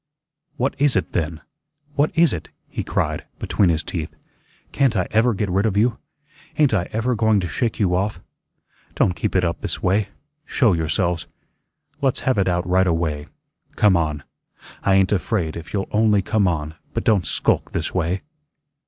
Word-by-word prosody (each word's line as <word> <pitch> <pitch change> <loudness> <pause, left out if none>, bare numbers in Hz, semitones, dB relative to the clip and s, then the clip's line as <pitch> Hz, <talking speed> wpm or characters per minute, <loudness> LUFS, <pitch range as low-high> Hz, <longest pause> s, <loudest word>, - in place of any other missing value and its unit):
"What 130 +3 0
IS 145 -2 +4
it, 95 - 0
then? 80 -1 -2 0.5
What 145 +1 +2
is 165 -3 +5
it?" 80 -4 -6 0.2
he - - -4
cried, - - -1
between 100 -4 +1
his 80 -1 +1
teeth. 80 -3 -5 0.6
"Can't 130 -6 +2
I 90 - +1
ever 115 +1 +3
get 100 +1 -1
rid 95 +4 +1
of 100 -2 -1
you? 115 +2 +2 0.6
Ain't 145 -6 +4
I 90 -4 0
EVER 115 +3 0
going 110 -2 +3
to 90 - -2
shake 115 +5 -2
you 95 -4 +2
off? 95 +1 0 0.8
Don' - - +3
keep - - -3
it 90 - +3
up 85 - -2
this - - -4
way. 100 +2 +2 0.3
Show 120 -9 +2
yourselves. 85 +1 0 0.7
Let's 135 -3 +1
have 130 -6 +1
it 95 - +2
out 90 -1 0
right 95 +1 +3
away. 80 -3 -1 0.5
Come 105 -3 +4
on. 75 -4 -1 0.6
I 95 - +3
ain't 95 -1 +3
afraid 95 -4 0
if 85 -1 -8
you'll 100 -2 -2
only 105 -2 +3
come 100 0 +2
on; 80 -3 -2 0.2
but - - -1
don't 100 -5 +2
skulk - - +1
this - - -3
way." 90 +1 -1
95 Hz, 180 wpm, -22 LUFS, 85-110 Hz, 0.8 s, is